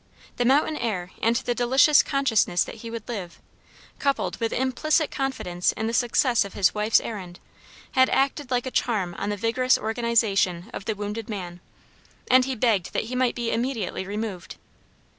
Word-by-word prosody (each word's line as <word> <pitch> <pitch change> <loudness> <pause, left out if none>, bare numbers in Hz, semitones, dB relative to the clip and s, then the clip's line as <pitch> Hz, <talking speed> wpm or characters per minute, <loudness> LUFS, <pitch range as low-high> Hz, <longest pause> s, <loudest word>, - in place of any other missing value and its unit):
The 245 - +1
mountain 295 +4 +3
air 185 -6 -3
and 230 +1 +2
the 245 -1 -1
delicious 265 +5 +5
consciousness 225 -10 +1
that - - -9
he 230 - -7
would 230 -2 -7
live, 195 -8 -6 0.6
coupled 280 -1 0
with 230 -1 -1
implicit 295 +5 +1
confidence 180 -10 -1
in 220 - -4
the 225 - -2
success 240 +1 +2
of 200 - -10
his 190 -2 +3
wife's 210 +1 +3
errand, 185 -5 -7 0.5
had 260 0 +4
acted 275 0 0
like 250 -1 0
a 260 - -4
charm 200 -10 0
on 200 - -2
the 205 - -2
vigorous 235 +4 +2
organization 220 -5 0
of 195 - -7
the 220 - -1
wounded 210 +2 -5
man, 180 -4 -6 0.7
and 255 0 +6
he 265 -1 -2
begged 215 -6 +1
that - - 0
he - - -2
might 250 -1 +1
be 235 -1 -2
immediately 230 -6 -2
removed. 205 -3 -5
230 Hz, 175 wpm, -25 LUFS, 200-255 Hz, 0.7 s, and